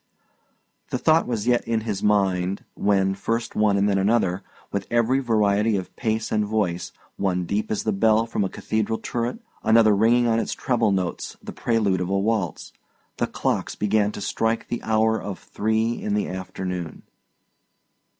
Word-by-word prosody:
The -, -, -1 dB
thought 160 Hz, +1 st, +3 dB
was 115 Hz, -4 st, -2 dB
yet 120 Hz, -1 st, +3 dB
in 115 Hz, -1 st, 0 dB
his 105 Hz, -3 st, -3 dB
mind, 95 Hz, -2 st, +1 dB
when, 95 Hz, -1 st, +2 dB
first 115 Hz, +4 st, -2 dB
one 105 Hz, -2 st, +3 dB
and 100 Hz, +1 st, +2 dB
then 100 Hz, -1 st, +2 dB
another, 95 Hz, -2 st, +1 dB, 0.3 s
with 100 Hz, -1 st, -3 dB
every 120 Hz, +3 st, +2 dB
variety 105 Hz, -3 st, +2 dB
of 95 Hz, -, -6 dB
pace 110 Hz, -1 st, -1 dB
and 105 Hz, -1 st, +2 dB
voice 100 Hz, -5 st, -1 dB, 0.3 s
one 90 Hz, -2 st, 0 dB
deep 100 Hz, +5 st, -1 dB
as 105 Hz, -, -1 dB
the 110 Hz, -, 0 dB
bell 110 Hz, +3 st, +3 dB
from 115 Hz, -3 st, -1 dB
a 95 Hz, -, -1 dB
cathedral 110 Hz, +2 st, -2 dB
turret, 120 Hz, -, -3 dB, 0.2 s
another 110 Hz, -2 st, +5 dB
ringing 115 Hz, +4 st, +4 dB
on 115 Hz, -1 st, +2 dB
its -, -, -2 dB
treble 115 Hz, -4 st, +1 dB
notes 95 Hz, -2 st, -2 dB
the -, -, -7 dB
prelude 105 Hz, -6 st, +1 dB
of 90 Hz, -, -2 dB
a 100 Hz, -, +1 dB
waltz, 100 Hz, -5 st, -1 dB, 0.4 s
the -, -, 0 dB
clocks -, -, -2 dB
began 105 Hz, 0 st, +1 dB
to -, -, -7 dB
strike 110 Hz, +3 st, -1 dB
the 120 Hz, -, -3 dB
hour 110 Hz, 0 st, +2 dB
of 100 Hz, -2 st, -5 dB
three 110 Hz, -, -1 dB
in 210 Hz, 0 st, -1 dB
the 210 Hz, -, 0 dB
afternoon. 90 Hz, -2 st, -5 dB
105 Hz, 170 wpm, -24 LUFS, 100-115 Hz, 0.4 s, another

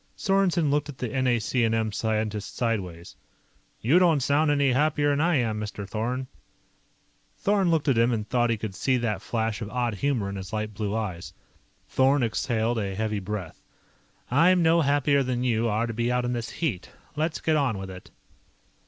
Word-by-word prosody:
Sorensen 185 Hz, -6 st, +2 dB
looked 150 Hz, 0 st, 0 dB
at 140 Hz, -, -8 dB
the 125 Hz, -, -3 dB
NAC&M 115 Hz, -2 st, +1 dB
scientist 110 Hz, -1 st, -2 dB
sideways. 95 Hz, -8 st, -3 dB, 0.7 s
"You 145 Hz, +11 st, +4 dB
don't 170 Hz, -5 st, +4 dB
sound 145 Hz, +4 st, +2 dB
any 140 Hz, -2 st, +3 dB
happier'n 145 Hz, +1 st, +2 dB
I 170 Hz, +1 st, +2 dB
am, 115 Hz, -5 st, 0 dB
Mr. 105 Hz, -1 st, -5 dB
Thorn." 120 Hz, +5 st, -2 dB, 1.1 s
Thorn 195 Hz, -3 st, +2 dB
looked 160 Hz, -2 st, +1 dB
at 130 Hz, -5 st, +3 dB
him 115 Hz, +1 st, +3 dB
and 110 Hz, -2 st, -2 dB
thought 120 Hz, +1 st, +1 dB
he 115 Hz, -, +1 dB
could 105 Hz, -2 st, -5 dB
see 130 Hz, +7 st, +1 dB
that 110 Hz, -5 st, -2 dB
flash 110 Hz, -1 st, -2 dB
of 105 Hz, -, -4 dB
odd 120 Hz, -2 st, -1 dB
humor 120 Hz, -1 st, -1 dB
in 100 Hz, 0 st, -5 dB
his 95 Hz, -2 st, -7 dB
light 110 Hz, 0 st, -3 dB
blue 105 Hz, 0 st, -3 dB
eyes. 90 Hz, -8 st, -4 dB, 0.5 s
Thorn 135 Hz, +1 st, +3 dB
exhaled 115 Hz, 0 st, 0 dB
a 100 Hz, -2 st, -3 dB
heavy 110 Hz, 0 st, -1 dB
breath. 95 Hz, -3 st, -6 dB, 0.7 s
"I'm 170 Hz, +6 st, +4 dB
no 165 Hz, +1 st, +4 dB
happier 140 Hz, -1 st, +2 dB
than 125 Hz, -2 st, -1 dB
you 115 Hz, -2 st, +1 dB
are 110 Hz, +2 st, 0 dB
to 115 Hz, -, -4 dB
be 120 Hz, +2 st, 0 dB
out 125 Hz, 0 st, 0 dB
in 120 Hz, -, -1 dB
this 115 Hz, -2 st, -3 dB
heat. 145 Hz, -, -3 dB, 0.3 s
Let's 155 Hz, +1 st, -1 dB
get 160 Hz, -, +1 dB
on 135 Hz, -8 st, +1 dB
with 95 Hz, 0 st, -6 dB
it." 95 Hz, 0 st, -11 dB
120 Hz, 180 wpm, -26 LUFS, 110-140 Hz, 1.1 s, You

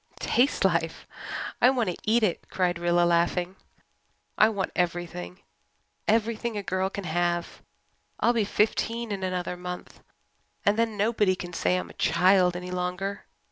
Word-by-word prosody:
"Taste 250 Hz, -4 st, +2 dB
life! 165 Hz, -3 st, 0 dB, 0.6 s
I 250 Hz, -, +7 dB
want 245 Hz, -7 st, +1 dB
to -, -, -6 dB
eat 225 Hz, +2 st, +3 dB
it," 190 Hz, -5 st, -1 dB
cried 175 Hz, -2 st, 0 dB
Rilla, 175 Hz, 0 st, +3 dB
laughing. 175 Hz, +2 st, +1 dB, 0.8 s
"I 215 Hz, -, +5 dB
want 200 Hz, -3 st, -2 dB
everything 170 Hz, -, -3 dB, 0.7 s
everything 225 Hz, +1 st, +1 dB
a 205 Hz, -, -3 dB
girl 190 Hz, 0 st, -1 dB
can 200 Hz, 0 st, -6 dB
have. 175 Hz, 0 st, -1 dB, 0.6 s
I'll 240 Hz, -, +3 dB
be 230 Hz, -2 st, +2 dB
fifteen 225 Hz, +2 st, 0 dB
in 195 Hz, -1 st, -3 dB
another 180 Hz, -1 st, -2 dB
month, 180 Hz, 0 st, -8 dB, 0.6 s
and 205 Hz, -, +4 dB
then 225 Hz, -1 st, 0 dB
nobody 205 Hz, -2 st, +2 dB
can 175 Hz, -1 st, -7 dB
say 180 Hz, +2 st, +1 dB
I'm 180 Hz, -, -5 dB
a -, -, -11 dB
child 185 Hz, -1 st, +4 dB
any 180 Hz, 0 st, -5 dB
longer. 180 Hz, +2 st, -3 dB
185 Hz, 150 wpm, -27 LUFS, 175-215 Hz, 0.8 s, I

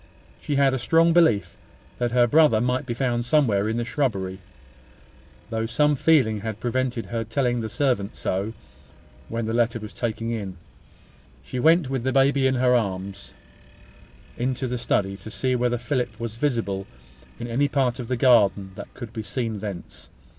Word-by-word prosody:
She 145 Hz, -, -2 dB
had 140 Hz, -1 st, +4 dB
a 130 Hz, -, -1 dB
strong 165 Hz, +6 st, +4 dB
belief 160 Hz, -12 st, +3 dB, 0.4 s
that 120 Hz, -1 st, 0 dB
her 120 Hz, 0 st, +4 dB
brother 150 Hz, -3 st, +4 dB
might 125 Hz, +3 st, -1 dB
be 120 Hz, -, -2 dB
found 120 Hz, -2 st, 0 dB
somewhere 115 Hz, -7 st, +2 dB
in 110 Hz, -, -1 dB
the 120 Hz, -, 0 dB
shrubbery, 100 Hz, -9 st, -2 dB, 1.1 s
though 115 Hz, 0 st, -1 dB
some 150 Hz, +5 st, +2 dB
feeling 130 Hz, -8 st, +3 dB
had 110 Hz, -1 st, -5 dB
prevented 125 Hz, -1 st, -1 dB
her 115 Hz, -1 st, -3 dB
telling 120 Hz, +2 st, 0 dB
the 110 Hz, -, -4 dB
servant 125 Hz, -9 st, 0 dB
so 100 Hz, +4 st, -2 dB, 0.8 s
when 115 Hz, 0 st, -2 dB
the 110 Hz, -, -2 dB
letter 115 Hz, -1 st, +1 dB
was 105 Hz, -1 st, -9 dB
taken 115 Hz, -1 st, -3 dB
in. 100 Hz, -5 st, -4 dB, 0.9 s
She 125 Hz, -, -5 dB
went, 160 Hz, +2 st, +4 dB
with 135 Hz, -1 st, -2 dB
the 130 Hz, -, 0 dB
baby 135 Hz, 0 st, +3 dB
in 130 Hz, -, +1 dB
her 125 Hz, 0 st, +3 dB
arms, 100 Hz, -3 st, -2 dB, 1.0 s
into 130 Hz, +2 st, -1 dB
the 125 Hz, 0 st, -3 dB
study, 100 Hz, -4 st, 0 dB
to 100 Hz, +3 st, -10 dB
see 130 Hz, +5 st, -1 dB
whether 120 Hz, 0 st, +1 dB
Philip 120 Hz, -3 st, -2 dB
was 115 Hz, -2 st, -4 dB
visible 115 Hz, -7 st, -1 dB, 0.5 s
in -, -, -4 dB
any 130 Hz, +5 st, +1 dB
part 130 Hz, -3 st, 0 dB
of 120 Hz, -, -5 dB
the 125 Hz, 0 st, -1 dB
garden 105 Hz, -6 st, +4 dB
that -, -, -9 dB
could 120 Hz, -3 st, -8 dB
be 110 Hz, -, -4 dB
seen 115 Hz, -1 st, -3 dB
thence. 100 Hz, -4 st, -8 dB
120 Hz, 175 wpm, -24 LUFS, 110-130 Hz, 1.1 s, had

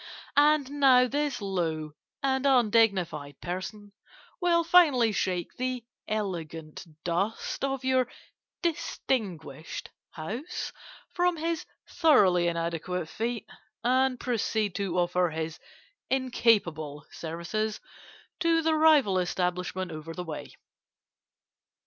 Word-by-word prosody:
And 290 Hz, -1 st, +4 dB
now 255 Hz, -2 st, +6 dB
this 280 Hz, -3 st, -1 dB
low 165 Hz, -5 st, -2 dB, 0.3 s
and 265 Hz, 0 st, +2 dB
undignified 205 Hz, -, +2 dB
person 195 Hz, +3 st, -6 dB, 0.5 s
will 340 Hz, -1 st, +3 dB
finally 305 Hz, -10 st, +5 dB
shake 180 Hz, -3 st, -1 dB
the 255 Hz, -2 st, -2 dB, 0.2 s
elegant 170 Hz, -6 st, -4 dB, 0.2 s
dust 195 Hz, +10 st, -2 dB
of 270 Hz, -1 st, -1 dB
your 260 Hz, -1 st, +3 dB, 0.6 s
distinguished 190 Hz, -, -3 dB, 0.2 s
house 225 Hz, -, -5 dB, 0.4 s
from 355 Hz, -1 st, +2 dB
his 330 Hz, 0 st, -2 dB, 0.2 s
thoroughly 190 Hz, -, +4 dB
inadequate 170 Hz, 0 st, -2 dB
feet, 230 Hz, +3 st, -3 dB, 0.4 s
and 255 Hz, +1 st, +2 dB
proceed 220 Hz, -4 st, 0 dB
to 190 Hz, -3 st, -2 dB
offer 180 Hz, 0 st, +2 dB
his 160 Hz, +1 st, -4 dB, 0.5 s
incapable 195 Hz, -, +1 dB
services 170 Hz, +7 st, -3 dB, 0.6 s
to 330 Hz, -1 st, +3 dB
the 320 Hz, 0 st, +3 dB
rival 300 Hz, -11 st, +5 dB
establishment 180 Hz, 0 st, -2 dB
over 160 Hz, +1 st, -7 dB
the 180 Hz, -, -4 dB
way. 160 Hz, -3 st, -7 dB
210 Hz, 100 wpm, -28 LUFS, 175-265 Hz, 0.6 s, now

